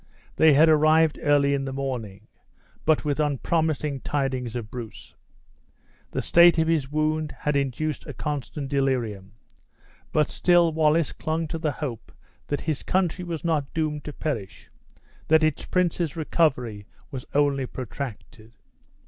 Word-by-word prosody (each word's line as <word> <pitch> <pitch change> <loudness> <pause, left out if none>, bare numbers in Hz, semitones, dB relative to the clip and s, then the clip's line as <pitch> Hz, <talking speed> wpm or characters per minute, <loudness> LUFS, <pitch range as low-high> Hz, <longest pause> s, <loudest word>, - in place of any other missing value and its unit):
They 160 -1 +6
had 155 +4 +6
arrived 155 0 +4
early 145 -2 +3
in 135 -1 -1
the 135 - -4
morning, 120 -7 -5 0.6
but 155 -1 +2
with 145 0 -1
unpromising 150 0 0
tidings 130 -4 -2
of 115 -3 -5
Bruce. 115 -4 -9 1.0
The - - -3
state 170 0 +6
of 160 0 +2
his 150 -5 0
wound 155 0 0
had 150 -1 0
induced 140 +2 -2
a - - -6
constant 145 -1 -4
delirium. 125 -8 -1 0.8
But 150 -1 +2
still 175 -2 +3
Wallace 155 0 +2
clung 160 +1 -2
to 165 - -4
the 155 -3 -1
hope 130 -8 -6 0.4
that 145 - -2
his 155 -3 -2
country 180 -1 0
was 170 -2 -5
not 150 -4 0
doomed 155 -2 -1
to 150 - -5
perish 120 -13 -5 0.6
that 160 0 +5
its 155 -2 0
prince's 175 -3 0
recovery 125 -10 0 0.2
was 130 -2 -7
only 140 -2 +2
protracted. 120 -3 -8
150 Hz, 140 wpm, -25 LUFS, 130-160 Hz, 1.0 s, They